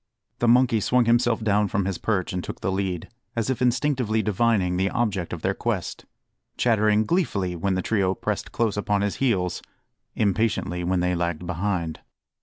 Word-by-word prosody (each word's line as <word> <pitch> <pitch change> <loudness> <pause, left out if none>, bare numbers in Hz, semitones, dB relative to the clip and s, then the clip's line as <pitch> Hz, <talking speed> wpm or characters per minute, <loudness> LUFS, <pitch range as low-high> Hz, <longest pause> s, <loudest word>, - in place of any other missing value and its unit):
The 120 - +1
monkey 120 -1 +4
swung 125 +4 +2
himself 120 -1 +2
down 105 -1 +2
from 100 0 -1
his 95 -2 -2
perch 95 -6 -1
and 90 -1 -2
took - - -7
the 95 - -1
lead, 95 -3 -2 0.3
as 115 +2 0
if 130 - -3
instinctively 125 -3 +1
divining 105 -4 +1
the 95 +2 +1
object 100 -7 -1
of - - -6
their - - +1
quest; - - -3 0.5
chattering 110 -2 +3
gleefully 100 - 0
when 95 +3 0
the 95 - -1
trio 95 -4 +1
pressed - - -3
close 110 -3 0
upon 105 -1 0
his 100 -1 -1
heels 95 -10 0 0.5
impatiently 100 -4 0
when 90 0 +1
they 90 0 +1
lagged 85 -1 -2
behind. 85 -2 -2
105 Hz, 175 wpm, -24 LUFS, 90-115 Hz, 0.5 s, monkey